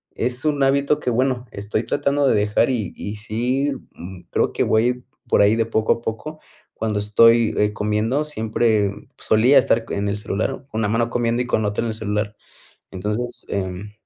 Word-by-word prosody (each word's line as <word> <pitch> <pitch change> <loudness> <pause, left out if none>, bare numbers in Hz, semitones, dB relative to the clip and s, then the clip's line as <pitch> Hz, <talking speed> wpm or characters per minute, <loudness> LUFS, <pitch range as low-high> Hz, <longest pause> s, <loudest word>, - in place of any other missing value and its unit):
es 125 +4 -2
un 145 -2 +2
hábito 140 +2 +2
que 125 - -2
bueno, 125 +1 0
estoy 105 +2 -3
tratando 140 +4 +1
de - - +4
dejar 105 +3 +2
y 115 -5 -2
y 105 +1 -6
sí, 125 +7 -1 0.2
mm, 90 +1 -10
creo - - +1
que - - +1
voy 125 +3 +1 0.2
por - - +4
ahí 105 +2 +4
de 115 -1 +1
poco 110 -1 +2
a - - -9
poco. 155 +8 -5 0.4
Cuando 105 -2 -1
estoy, 115 +2 +4
eh, 105 0 +2
comiendo 105 +7 0
siempre, 110 -6 +1 0.2
pues - - -8
solía 120 +6 +5
estar 115 0 +1
en 100 0 -1
el 100 - -1
celular 105 +1 -2 0.2
con 110 - -3
una 105 - +1
mano 115 +2 +1
comiendo 120 0 0
y 125 - -3
con 110 - +1
la 105 - +1
otra 105 - -2
en 115 - -1
el 110 - -2
celular. 105 0 -2 0.6
Entonces, 105 +6 -4
em, 95 +1 -4
110 Hz, 195 wpm, -21 LUFS, 105-125 Hz, 0.6 s, solía